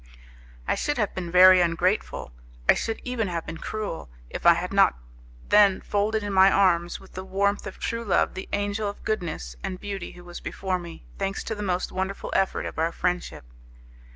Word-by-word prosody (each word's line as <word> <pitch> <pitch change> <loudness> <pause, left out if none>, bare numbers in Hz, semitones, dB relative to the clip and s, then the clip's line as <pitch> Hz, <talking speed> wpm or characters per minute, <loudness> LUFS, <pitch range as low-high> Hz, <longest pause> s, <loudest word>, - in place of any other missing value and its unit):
I - - +2
should 295 - -1
have 210 -4 0
been 180 -2 -4
very 185 +1 +8
ungrateful, 175 - 0 0.4
I - - +8
should, 225 -1 -3
even 250 -4 -2
have 170 -2 -3
been 160 - -7
cruel, 210 - -5 0.2
if - - -1
I 170 - +8
had 180 +3 -4
not 195 - +4 0.5
then 205 -2 +6
folded 210 +1 0
in 205 -1 -3
my 190 +1 +7
arms 175 -3 +2
with 190 - -16
the 185 - -6
warmth 200 +2 0
of 200 - -8
true 230 0 -3
love 205 - +2
the 190 - -7
angel 205 +1 -1
of 200 - -10
goodness 170 - -3
and 185 - -4
beauty 200 -3 -6
who 175 - -13
was 175 0 -8
before 190 -1 -3
me, 170 -2 -10
thanks 195 0 -2
to - - -3
the 210 - -6
most 185 -3 -1
wonderful 190 +1 -3
effort 195 - +1
of 165 +1 -2
friendship. 180 - -2
190 Hz, 190 wpm, -25 LUFS, 175-205 Hz, 0.5 s, very